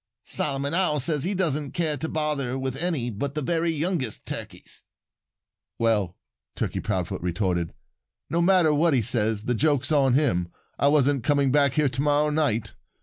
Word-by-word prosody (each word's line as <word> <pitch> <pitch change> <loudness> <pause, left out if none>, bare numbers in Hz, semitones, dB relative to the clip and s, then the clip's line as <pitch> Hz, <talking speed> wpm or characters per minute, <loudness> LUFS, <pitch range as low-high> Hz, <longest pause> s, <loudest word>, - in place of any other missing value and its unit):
"Solomon 140 +1 0
Owl 170 -4 +2
says 150 +1 0
he 195 +3 -1
doesn't 150 -6 -1
care 160 -4 0
to 160 +3 -4
bother 150 -5 -2
with 130 -1 -3
any 150 -7 -1
but 140 +7 -4
the 150 - -1
very 170 +3 0
youngest 160 - -2
Turkeys." - - -7 1.0
"Well," 105 -6 0 0.4
Turkey - - -2
Proudfoot - - -3
retorted, 90 -1 -1 0.6
"no 170 +2 0
matter 175 -3 +4
what 155 0 +3
he 120 - +2
says, 110 -2 0
the 125 - 0
joke's 145 +3 +1
on 135 -4 +3
him. 95 - +1 0.3
I 140 - +3
wasn't 145 -3 +3
coming 140 -2 +2
back 140 -1 +3
here 150 -3 +3
to 135 +1 -3
morrow 150 +1 +2
night. 115 -9 0
140 Hz, 165 wpm, -25 LUFS, 125-155 Hz, 1.0 s, matter